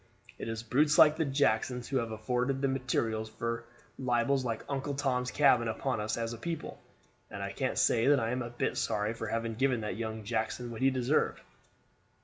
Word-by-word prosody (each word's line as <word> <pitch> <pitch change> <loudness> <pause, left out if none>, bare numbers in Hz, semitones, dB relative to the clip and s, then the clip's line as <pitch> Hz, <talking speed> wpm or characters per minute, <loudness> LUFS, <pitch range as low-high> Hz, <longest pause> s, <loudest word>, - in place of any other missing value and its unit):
It - - -5
is 115 0 -4
brutes 150 +6 +3
like 150 -1 +8
the 160 0 0
Jacksons 125 -3 +1
who 135 - 0
have 115 -2 -1
afforded 125 +5 -1
the 135 - +1
materials 115 -4 -1
for 115 +1 -4 0.3
libels 130 +1 +1
like 115 -3 -3
'Uncle 140 0 -2
Tom's 125 -2 0
Cabin' 130 -5 +4
upon 115 +1 -1
us 105 +1 -2
as 115 0 -2
a 115 - -8
people; 165 +3 -5 0.5
and - - -6
I - - -3
can't - - -2
say 115 +2 +3
that 145 -1 +5
I 115 0 -1
am 125 +1 -1
a 120 - -4
bit 120 - -2
sorry 105 +2 0
for 115 -1 -5
having 115 +1 -2
given 125 0 +1
that 105 -3 -4
young 110 -1 -4
Jackson 115 +2 -2
what 115 - -7
he 135 - +5
deserved." 130 +3 +1
120 Hz, 200 wpm, -31 LUFS, 115-135 Hz, 0.5 s, like